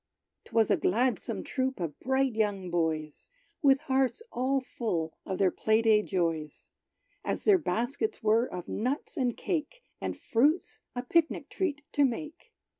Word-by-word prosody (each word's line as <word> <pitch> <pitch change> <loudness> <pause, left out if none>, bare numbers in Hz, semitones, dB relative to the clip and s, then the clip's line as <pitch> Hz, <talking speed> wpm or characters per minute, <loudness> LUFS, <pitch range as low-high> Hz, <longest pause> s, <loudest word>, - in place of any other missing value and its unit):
'Twas 225 -2 +2
a - - +4
gladsome 245 +6 0
troop 265 -2 -2
of 165 -4 -4
bright 265 -1 +1
young 205 -4 -1
boys, 160 -3 -2 0.3
With 275 -1 +5
hearts 265 - +1
all 265 +2 +1
full 180 -11 -3
of 190 - -2
their 190 -2 +3
play 220 +1 +2
day 215 -2 +5
joys, 165 -6 -2 0.5
As - - -2
their 405 -3 +6
baskets 280 - -2
were 225 +3 +4
of 180 -1 -6
nuts 255 - -2
and 250 -6 0
cake, 375 +9 -3 0.2
And - - -3
fruits, 290 +10 +1 0.2
a 245 - -2
pic 325 +5 +3
nic - - -7
treat 300 -6 -2
to 290 - +3
make. 295 +4 -3
245 Hz, 155 wpm, -29 LUFS, 195-275 Hz, 0.5 s, their